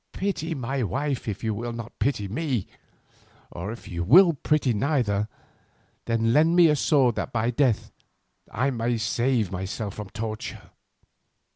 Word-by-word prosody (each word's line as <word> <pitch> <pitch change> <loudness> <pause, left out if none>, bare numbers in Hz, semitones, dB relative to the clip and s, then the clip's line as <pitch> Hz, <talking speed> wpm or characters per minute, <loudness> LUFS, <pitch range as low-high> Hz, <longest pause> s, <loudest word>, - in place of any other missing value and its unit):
Pity 170 -4 -2
my 135 0 -2
wife 135 +3 -2
if 105 0 -4
you 110 -1 0
will 120 +3 -4
not 115 -1 -8
pity 110 -4 0
me, 125 - -2 0.9
or 90 +5 -5
if 115 - -10
you 85 -1 -3
will 170 - +7
pity 145 -3 +1
neither, 105 -4 0 0.8
then 115 0 +1
lend 160 +3 +4
me 175 -2 +7
a 150 - +4
sword 135 -4 +3
that - - -3
by 115 +1 0
death 125 -3 +1 0.6
I 130 +5 0
may 120 -1 -1
save 115 -1 0
myself 95 +3 -4
from 105 -2 -7
torture. 110 +1 -6
120 Hz, 150 wpm, -25 LUFS, 110-140 Hz, 0.9 s, will